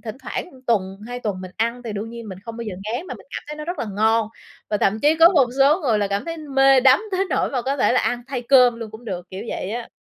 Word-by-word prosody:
thỉnh 220 0 -7
thoảng 355 - -5 0.2
tuần, 195 -4 0
2 245 0 -5
tuần 200 -5 -3
mình 185 - -8
ăn 235 +2 -1
thì 220 - -4
đương 210 +3 -5
nhiên 235 -2 -8
mình 185 -1 -8
không 230 -1 -7
bao 235 - -5
giờ 205 -4 -5
ngán 245 +11 -3
mà - - -6
mình - - -15
cảm - - -6
thấy 300 - -6
nó 305 - -6
rất 350 +2 -4
là - - -2
ngon. 220 0 +2 0.4
Và 210 - +2
thậm 210 +2 +1
chí 300 +5 +4
có 330 +1 +8
một 270 -7 +4
số 295 +7 +5
người 235 -8 +1
là 200 -1 0
cảm 200 0 -2
thấy 330 0 -4
mê 270 -3 +4
đắm 265 - +5
tới 380 +1 +1
nỗi - - +1
mà 255 -3 -1
có 275 +2 -1
thể 250 - +3
là 255 - +3
ăn 245 0 -1
thay 255 -3 -3
cơm 250 -1 +5
luôn 220 -2 -6
cũng 220 +2 -12
được, 180 -5 -5
kiểu 190 +3 -6
vậy 190 - -4
á. 235 +1 -5
235 Hz, 300 wpm, -22 LUFS, 215-270 Hz, 0.4 s, có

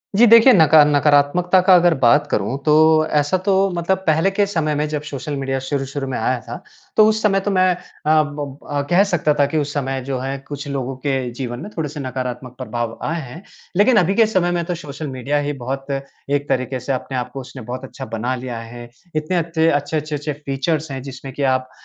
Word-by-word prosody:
जी, 230 +4 +6
देखिए 230 +3 +8
नका 160 -5 +7
नकारात्मकता 150 +5 +3
का 185 0 +5
अगर 175 -1 +5
बात 145 +5 +4
करूँ 105 +6 -1
तो 155 +1 +5
ऐसा 150 +4 +1
तो 195 -2 +3 0.2
मतलब 175 +3 0
पहले 160 +4 +3
के 205 +1 +2
समय 160 -6 -1
में 150 +1 0
जब 150 -1 -3
सोशल 145 0 -5
मीडिया 135 0 -2
शुरू-शुरू 135 +1 -3
में 130 - -3
आया 125 +3 0
था, 120 -1 -9 0.3
तो 215 - +7
उस 220 0 +1
समय 195 -2 +3
तो 205 +1 -2
मैं 185 -1 +3
अ, 180 - -14 0.4
ब 145 -2 -6
अ, 145 -1 0
कह 180 +3 +5
सकता 175 -6 +1
था 145 - +5
कि 155 - -2
उस 145 -1 -1
समय 135 -2 -2
जो 135 -2 -3
है, 135 +2 -3
कुछ 145 0 -6
लोगों 135 -1 -3
के 130 -1 -2
जीवन 120 -1 -5
में 205 - -7
थोड़े-से 150 -2 -4
नकारात्मक 125 -1 -5
प्रभाव 120 -3 -4
आए 165 +2 -2
हैं। 155 +7 -10 0.3
लेकिन 215 +4 +5
अभी 185 0 +3
के 225 - +5
समय 185 -5 +1
में 175 -1 -1
तो 175 0 -2
सोशल 150 -1 -7
मीडिया 135 +2 -2
ही 145 0 -2
बहुत 135 +2 -4
एक 140 +1 -4
तरीके 130 0 -1
से 135 - -3
अपने 130 0 -4
आप 125 0 -4
को 135 - -5
उसने 130 0 -10
बहुत 125 +3 -6
अच्छा 130 0 -8
बना 125 +4 -2
लिया 125 -2 -6
है, 120 +1 -10 0.3
इतने 155 +4 -1
अते 165 -1 +1
अच्छे, 145 +1 0
अच्छे, 155 0 -3
अच्छे 150 +1 -3
फीचर्स 145 +2 -2
हैं, 135 - -5
जिसमें 135 0 -9
कि 140 - -3
आप 130 -1 +1
145 Hz, 225 wpm, -20 LUFS, 130-165 Hz, 0.4 s, देखिए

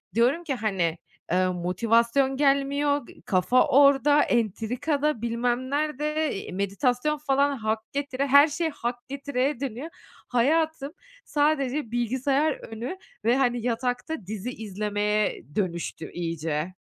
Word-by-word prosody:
Diyorum 250 +9 +3
ki, 310 -5 -2
hani, 190 -8 -1 0.3
eee, 185 +1 +3
"Motivasyon 230 +9 +1
gelmiyor 280 0 +2
g - - -16
kafa 200 +6 +3
orada, 285 +1 +5
entrikada, 250 - 0
bilmem 240 +2 -1
nerede." 300 +1 -1
eee, 195 - -6
meditasyon 245 +10 0
falan 280 -1 +1
hak 220 -1 -1
getire, 280 -1 -2
her 280 +2 +7
şey 320 +2 -1
hak 245 -4 -5
getireye 275 -1 -1
dönüyor. 270 +3 -4 0.4
Hayatım 290 +3 +1 0.3
sadece 290 -4 0
bilgisayar 260 +5 +1
önü 240 +11 -7 0.3
ve, 240 +3 +4
hani, 245 -3 +1
yatakta 245 +1 -2
dizi 215 +2 -4
izlemeye 210 -1 -1
dönüştü 170 -4 -3
iyice. 165 0 -3
250 Hz, 115 wpm, -26 LUFS, 220-285 Hz, 0.4 s, her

